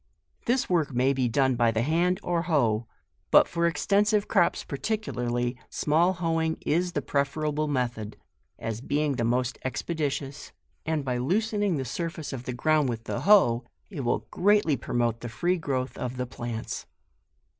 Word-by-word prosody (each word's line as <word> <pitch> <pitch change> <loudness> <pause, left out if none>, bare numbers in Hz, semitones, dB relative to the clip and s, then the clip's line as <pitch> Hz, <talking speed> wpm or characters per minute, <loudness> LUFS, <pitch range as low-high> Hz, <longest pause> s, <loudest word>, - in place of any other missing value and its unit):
" - - -40
This 245 +2 +2
work 165 -6 +1
may 130 +2 +2
be 130 -2 +1
done 130 +2 +2
either 125 - -1
by 120 -1 +4
the 110 0 0
hand 175 +5 +1
or 175 -1 0
hoe; 120 -10 +1 0.4
but, - - +7
for 170 0 +1
extensive 205 +4 +2
crops 175 -5 +2
particu 215 +9 -3
larly, 120 0 -1
small 165 +5 +2
hoeing 165 -2 0
is 175 +3 +1
the 145 - -1
preferable 150 +2 0
method, 120 -6 -2 0.4
as 115 0 -4
being 145 0 0
the 115 - 0
most 125 +1 0
expeditious, 145 0 -3 0.3
and 155 -3 0
by 125 -2 -1
loosening 205 - +1
the 135 - -3
surface 165 - -4
of 125 -2 -6
the 125 - -3
ground 150 +2 +2
with 115 -1 -4
the - - -3
hoe, 180 - +5 0.3
it 170 - -6
will 120 - 0
greatly 205 -5 +3
promote 120 -2 -1
the 120 - -6
free 175 +10 0
growth 130 -4 -2
of 125 0 -4
the 125 - -1
plants. 120 -2 -5
145 Hz, 170 wpm, -27 LUFS, 125-170 Hz, 0.4 s, but